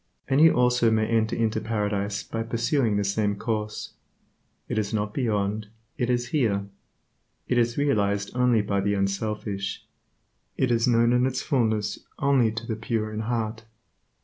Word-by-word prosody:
And 135 +2 +3
you 165 0 +7
also 125 -1 +3
may 110 -1 +2
enter 110 0 +1
into 110 -1 0
Paradise 105 -2 -2
by 115 - -4
pursuing 115 0 0
the 100 - +1
same 100 +1 0
course. 105 0 -3 0.7
It - - -1
is 100 -1 -2
not 105 0 -2
beyond, 105 -4 -1 0.3
it 120 - -1
is 120 -1 0
here. 105 -9 +1 0.8
It 125 - +2
is 120 0 +1
realized 100 -8 +1
only 125 -3 +3
by 100 -1 0
the 100 +1 +1
unselfish. 100 0 -2 0.7
It 130 -2 +1
is 115 0 +2
known 120 0 +4
in 125 +1 +3
its 130 0 -2
fullness 110 -7 0 0.2
only 135 -5 +3
to 115 +1 -5
the 115 - -2
pure 110 -1 -2
in 105 - -3
heart. 110 -1 -2
110 Hz, 160 wpm, -26 LUFS, 105-120 Hz, 0.8 s, you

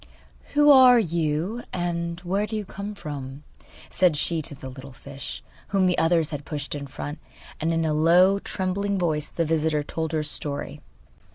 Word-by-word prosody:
'Who 295 0 +7
are 255 -2 +8
you, 170 +2 -1
and 170 -1 -3
where 195 +4 -1
do 220 - -4
you 210 -1 -3
come 200 +2 -7
from?' 145 -5 -7 0.4
said 180 -5 +2
she 165 +2 +1
to 145 - -3
the 130 - -9
little 130 +1 -10
fish, 140 +2 -8 0.2
whom 195 -1 +2
the 180 -1 +2
others 165 -1 +2
had 145 -1 -5
pushed 145 -1 -4
in 140 -1 -5
front. 145 +3 -7 0.4
And 165 +1 0
in 165 0 0
a 155 - +1
low, 175 +5 +5
trembling 200 +1 -2
voice, 155 -5 -1
the 165 - -1
visitor 155 -1 +1
told 160 +2 -4
her 155 -1 0
story. 145 -1 -2
165 Hz, 175 wpm, -25 LUFS, 150-190 Hz, 0.4 s, are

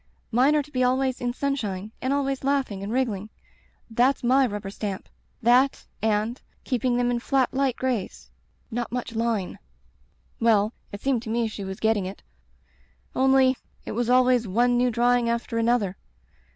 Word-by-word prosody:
Mine 260 +6 +4
are 295 - +2
to 295 - -17
be 255 -2 +1
always 260 +1 +1
in 245 0 0
sunshine 220 -7 -3
and 260 - -1
always 275 -1 -1
laughing 265 -8 0
and 200 +2 -4
wriggling. 225 -5 -1 0.6
That's 245 +4 +2
my 260 +2 +4
rubber 205 -3 -5
stamp 200 -2 -5 0.2
— - - -41
that 260 +3 +4
— - - -41 0.2
and 225 +4 -4
— - - -39
keeping 250 -1 0
them 245 0 +1
in 240 - 0
flat 265 +1 +1
light 265 -2 +1
grays 250 -7 -3 0.2
— - - -19
^not 240 0 -3
much 245 -1 -4
line.' 225 -4 -1 0.8
"Well, 220 -1 +3 0.2
it 205 - -7
seemed 265 -4 +1
to 230 - -8
me 230 0 +1
she 215 -2 -6
was 190 0 -6
getting 220 -4 +1
it; 195 - -9 0.9
only 265 0 +4
— - - -36
^it - - -5
was 240 +2 -1
always 250 -2 +4
one 240 +5 +2
new 245 +1 +3
drawing 240 0 +2
after 235 0 -1
another. 230 -5 +1
240 Hz, 180 wpm, -25 LUFS, 220-260 Hz, 0.9 s, Mine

